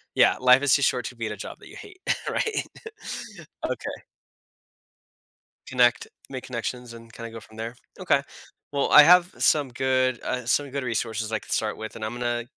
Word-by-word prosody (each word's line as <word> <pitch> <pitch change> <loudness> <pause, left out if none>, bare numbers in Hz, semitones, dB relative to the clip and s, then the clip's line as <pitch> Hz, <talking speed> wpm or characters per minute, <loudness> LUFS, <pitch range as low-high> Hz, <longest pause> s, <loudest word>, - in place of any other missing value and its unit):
Yeah, - - +5
life 125 +2 +6
is 145 - +4
too 140 - +1
short 125 -2 +1
to 125 - -6
be 115 -1 -4
at 105 - -4
a 105 - -6
job - - -8
that - - -14
you - - -13
hate, 375 -2 -12 0.3
right? 445 - -1 1.0
Okay. - - -4 1.7
Connect 455 - +3 0.2
make 130 -2 -6
connections 125 0 -5
and 115 0 -13
kinda 115 -1 -8
go 115 - -8
from 110 0 -17
there? 115 +2 -5 0.2
Okay. 155 -7 +2 0.5
Well, 140 -1 0
I 150 - +10
have 180 +2 +6
some 145 -3 +3
good 130 0 +1
uh, 125 -2 -3
some 140 +3 +1
good 140 -1 -3
resources 115 -2 -2
I 110 - 0
could - - -11
start 110 -1 0
with, 110 0 -7
and 110 - -5
I'm 110 - -4
gonna 120 -1 -2
125 Hz, 190 wpm, -25 LUFS, 115-140 Hz, 1.7 s, I